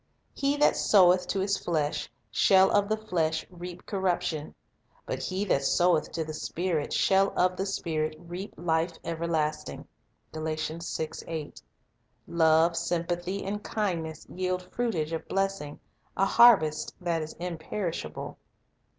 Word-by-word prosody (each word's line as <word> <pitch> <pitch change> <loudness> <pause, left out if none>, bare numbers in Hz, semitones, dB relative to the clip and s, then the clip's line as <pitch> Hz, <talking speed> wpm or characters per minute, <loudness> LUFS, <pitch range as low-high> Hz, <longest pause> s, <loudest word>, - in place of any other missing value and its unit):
"He 280 +1 0
that 295 - +4
soweth 180 -2 +5
to 195 - -1
his 200 +1 +1
flesh 155 -4 -1 0.2
shall 190 - +5
of 205 0 +2
the 215 - +1
flesh 165 -7 -1
reap 180 0 -9
corruption; 175 -6 -1 0.5
but - - -3
he 190 +2 -2
that 140 -8 +2
soweth 175 +3 +2
to 165 - -1
the 155 0 -6
Spirit 165 0 -2
shall 195 0 +3
of 180 0 +3
the 195 +2 -2
Spirit 155 -5 -2
reap 175 +4 -8
life 165 +1 0
ever 165 0 -3
lasting." 155 -2 -2 0.5
1 155 +1 -3 1.4
Love, 165 0 +4
sympathy, 175 +3 -2
and 205 +2 -3
kindness 165 -7 -3
yield 185 0 -2
fruitage 170 -10 -1
of 160 - -4
blessing, 195 -7 -2 0.4
a 195 - +4
harvest 195 -10 +5
that 170 -3 -1
is 155 0 -6
imperishable. 170 - -5
175 Hz, 130 wpm, -28 LUFS, 160-195 Hz, 1.4 s, soweth